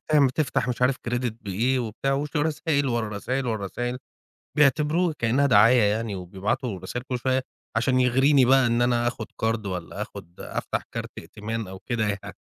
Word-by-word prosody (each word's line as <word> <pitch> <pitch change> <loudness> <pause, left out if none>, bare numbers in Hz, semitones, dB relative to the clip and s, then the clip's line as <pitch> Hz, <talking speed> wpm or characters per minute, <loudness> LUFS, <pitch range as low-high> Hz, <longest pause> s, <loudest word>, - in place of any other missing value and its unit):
أمّا 140 -3 +5
تفتح 135 -5 0
مش 125 0 -2
عارف 130 +1 +3
كريدت 120 -1 -2
بإيه 115 +7 +1
وبتاع 120 +4 -2
وش 145 +3 -2
رسايل، 150 -1 +1
ورا 120 -3 0
رسايل، 125 +6 -2
ورا 110 -4 -2
رسايل. 120 +5 -3 0.6
بيعتبروه 150 +4 +3
كإنّها 125 +5 +2
دعاية 115 0 +6
يعني 105 +1 0
وبيبعتوا 95 +3 -3
رسايل 120 +7 -5
كل 125 - -1
شوية 130 +1 +1 0.3
عشان 130 +2 +2
يغريني 130 +2 +4
بقى 130 +1 +5
إن 120 +1 +2
أنا 120 -1 +2
آخُد 120 -2 -5
قَرْض 110 -1 -1
والّا 90 -3 -4
آخُد 85 - -10
أفتح - - -3
كارت - - -4
ائتمان 110 +4 -5
أو 95 0 -8
كده 115 +2 -2
يعني. 100 -1 -5
120 Hz, 175 wpm, -25 LUFS, 110-135 Hz, 0.6 s, دعاية